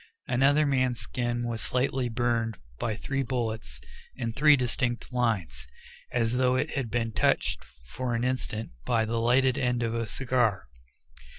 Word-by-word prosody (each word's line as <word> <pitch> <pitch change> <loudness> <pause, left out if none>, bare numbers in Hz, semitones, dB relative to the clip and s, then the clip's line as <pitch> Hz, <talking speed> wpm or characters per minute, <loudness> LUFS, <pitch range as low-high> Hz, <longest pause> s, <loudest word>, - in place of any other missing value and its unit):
Another 140 +4 +3
man's 130 -3 +1
skin 120 -1 -2
was 115 -1 -3
slightly 130 0 0
burned 115 -1 0 0.2
by 110 -2 -1
three 135 +5 -2
bullets 110 - -3 0.4
in 115 -2 -3
three 150 +3 +6
distinct 125 -1 -2
lines, 90 - -1 0.4
as 120 0 +1
though 130 0 +3
it 150 +5 0
had 135 -5 -2
been 115 0 -1
touched - - +1 0.2
for 120 - -3
an 115 - -1
instant 125 -3 -2
by 115 - +1
the 115 +1 -1
lighted 125 +2 +3
end 125 -2 +1
of 115 -1 -1
a 115 -1 -2
cigar. 120 -6 0
120 Hz, 155 wpm, -28 LUFS, 115-130 Hz, 0.4 s, three